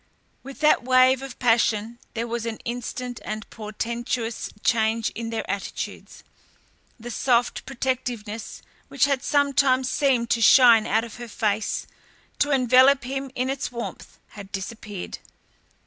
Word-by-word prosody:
With 275 +2 -11
that 305 - +5
wave 255 +1 +4
of 270 -2 -8
passion 230 -1 +1 0.2
there 230 +1 -1
was 235 0 -3
an 225 -1 -4
instant 245 +1 -5
and 215 0 -5
portentous 230 +2 -4
change 225 -1 +1
in 230 0 -5
their 225 -1 -4
attitudes. 200 -1 -5 0.8
The 240 +2 -7
soft 245 0 +1
protectiveness 240 -5 -4 0.2
which - - +2
had 275 -2 0
sometimes 275 -3 +2
seemed 260 -5 +1
to 230 - +2
shine 230 -2 +7
out 220 +1 +2
of 235 0 -9
her 240 0 -7
face, 215 -1 -1 0.5
to 290 - +2
envelop 260 0 +5
him 270 +2 -4
in 255 +1 -1
its 270 -1 -3
warmth, 235 -1 -7
had 200 -1 -11
disappeared. 205 -1 -6
240 Hz, 135 wpm, -24 LUFS, 225-260 Hz, 0.8 s, shine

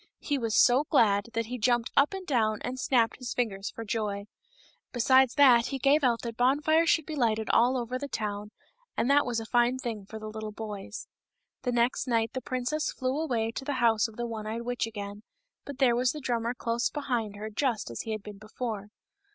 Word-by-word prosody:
He 285 -2 -2
was 230 -3 -1
so 255 +4 +5
glad 205 -5 +3
that 230 0 -1
he 250 +2 -5
jumped 240 0 +1
up 280 +1 +4
and 380 -1 -7
down 220 -7 +1
and 255 +1 -4
snapped 240 -4 +2
his 250 -2 -5
fingers 200 -5 -2
for 230 - -8
joy. 205 -2 -2 0.7
Besides 260 +1 +4
that 255 -5 +6
he 275 - -3
gave 280 +3 +3
out 235 -3 +2
that 230 -2 -5
bonfires 300 +6 +3
should 320 - +3
be 310 - -5
lighted 220 -5 +1
all 245 +3 +4
over 250 +1 -3
the 285 - -4
town, 210 -4 -4 0.5
and 255 - +2
that 285 -1 +4
was 240 -2 -1
a 225 - -6
fine 240 +2 +2
thing 225 -6 -5
for 220 - -8
the 215 - -8
little 215 0 -6
boys. 210 -1 -7 0.5
The 250 - -1
next 240 +2 +1
night 230 -2 +1
the 260 - -3
princess 255 +3 -2
flew 260 +2 -2
away 230 -7 -1
to 250 - -6
the 285 - -2
house 235 -4 +3
of 225 - -14
the 240 - -3
one 220 -2 -5
eyed 230 +2 -4
witch 245 -1 -2
again, 205 -2 -7 0.4
but 285 -2 -7
there 255 -4 +4
was 250 +1 +1
the 305 - -6
drummer 240 -2 -1
close 235 0 -1
behind 240 -8 -2
her 215 +1 -6
just 230 - -1
as 115 - -4
he 225 - -5
had 215 -2 -4
been 210 -1 -10
before. 215 -1 -5
235 Hz, 215 wpm, -28 LUFS, 220-260 Hz, 0.7 s, that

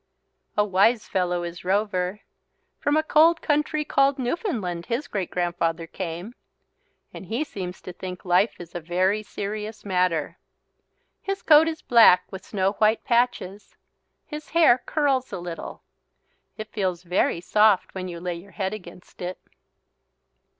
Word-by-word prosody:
A 210 - +4
wise 210 +4 +3
fellow 180 -1 0
is 170 0 -7
Rover. 190 0 0 0.6
From 290 +1 +1
a 310 - +2
cold 325 +2 +5
country 300 0 0
called 275 0 +2
Newfoundland 240 - -3
his 245 +5 -2
great 195 -4 -3
grandfather 170 -2 -1
came. 175 +5 -6 0.8
And 190 - -9
he 235 - -1
seems 185 -10 -7
to 180 - -8
think 180 +1 -8
life 185 +5 +3
is 170 -1 -10
a 175 - -3
very 185 +5 +1
serious 215 +1 -6
matter. 180 -5 0 0.8
His 390 0 -4
coat 310 0 +7
is 320 -1 -4
black 225 -7 +6
with 190 -1 -8
snow 195 -2 0
white 215 +1 +3
patches. 235 -5 -1 0.5
His 300 -1 -8
hair 315 -7 +5
curls 275 -4 +1
a - - -4
little. 175 -1 -7 0.7
It 215 0 -7
feels 185 -4 -2
very 180 -1 +1
soft 210 +2 +3
when 185 -1 -5
you 170 -1 -7
lay 180 0 -3
your 190 +3 -14
head 190 -1 -2
against 180 -3 -11
it. 180 +1 -4
195 Hz, 145 wpm, -24 LUFS, 180-245 Hz, 0.8 s, coat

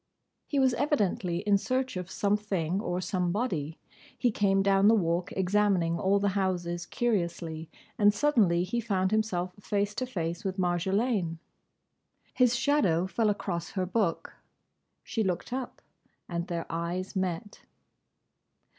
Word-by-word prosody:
He 290 - -2
was 260 -2 +4
evidently 200 - 0
in 205 -1 +3
search 255 +2 -1
of 180 0 -4
something 200 -4 0
or 180 -5 -2
somebody. 180 - -1 0.4
He 245 - +2
came 195 -2 +2
down 195 0 +4
the 225 - +7
Walk 175 -3 0
examining 190 -3 +2
all 195 +3 +3
the 200 0 +1
houses 175 -3 -1
curiously; 170 -8 -2 0.3
and 205 -1 +6
suddenly 205 -8 +3
he 235 +6 -2
found 190 -4 0
himself 185 -5 0
face 205 0 -1
to 255 +4 -3
face 170 -7 -3
with 190 0 -3
Marjolaine. 185 +1 0 1.0
His 250 -2 +3
shadow 235 - +2
fell 215 +3 +1
across 175 -4 -3
her 185 -2 0
book. 190 -2 -1 0.7
She 225 - -1
looked 190 +5 -2
up; 255 -1 -5 0.4
and 170 0 -3
their 170 -2 -3
eyes 175 +4 -3
met. 185 +1 -3
190 Hz, 135 wpm, -29 LUFS, 175-210 Hz, 1.0 s, the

